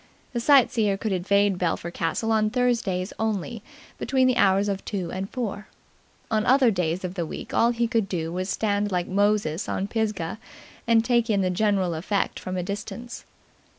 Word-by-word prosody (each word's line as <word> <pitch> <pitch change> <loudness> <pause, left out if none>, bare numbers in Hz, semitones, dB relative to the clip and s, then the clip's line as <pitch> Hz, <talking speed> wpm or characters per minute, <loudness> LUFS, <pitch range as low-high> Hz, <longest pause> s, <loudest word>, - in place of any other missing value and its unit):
The 240 - -1
sightseer 230 -6 +4
could 215 +1 -3
invade 195 +1 +2
Belpher 170 -1 -1
Castle 180 +7 -1
on 215 -1 +3
Thursdays 225 -7 0
only, 220 +1 -2 0.4
between 260 -1 +2
the 255 -1 +3
hours 195 -2 +3
of 195 -1 -2
two 185 -5 -4
and 190 +1 -4
four. 210 -5 -4 0.6
On 215 -1 +2
other 255 0 +5
days 180 -2 -1
of 180 -1 -3
the 180 -3 -2
week 160 - -7
all 230 - +4
he 235 0 0
could 225 -4 0
do 165 -2 -3
was 185 +1 -2
to - - -1
stand 205 -1 0
like 180 -1 0
Moses 200 -4 +1
on 195 - -1
Pisgah 215 -3 -2 0.5
and 230 -1 +4
take 235 -1 +2
in 200 -2 +2
the 185 -1 +1
general 190 -2 +1
effect 190 +5 -1
from 185 0 -5
a 180 - -1
distance. 210 +5 -6
205 Hz, 185 wpm, -25 LUFS, 185-225 Hz, 0.6 s, other